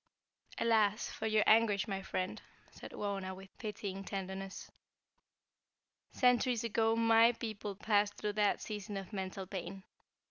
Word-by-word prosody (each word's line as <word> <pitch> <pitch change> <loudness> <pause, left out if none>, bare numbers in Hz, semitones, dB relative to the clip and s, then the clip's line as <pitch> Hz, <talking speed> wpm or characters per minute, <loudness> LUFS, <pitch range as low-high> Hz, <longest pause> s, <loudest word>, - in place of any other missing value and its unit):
"Alas, 215 -2 +2
for 220 - -3
your 215 -1 +3
anguish, 215 -2 +4
my 195 -2 -3
friend," 185 +2 -3 0.3
said - - -10
Wauna, 195 -2 -3
with 190 0 -13
pityng 200 -3 -5
tenderness. 195 0 -6 1.4
"Centuries 250 -2 +3
ago 225 0 +2
my 230 +1 +5
people 215 -3 -5
passed 205 0 +1
through 210 -1 -3
that 205 -1 +2
season 205 -1 -5
of 195 +2 -7
mental 190 0 -4
pain. 190 0 -6
205 Hz, 130 wpm, -34 LUFS, 195-225 Hz, 1.4 s, my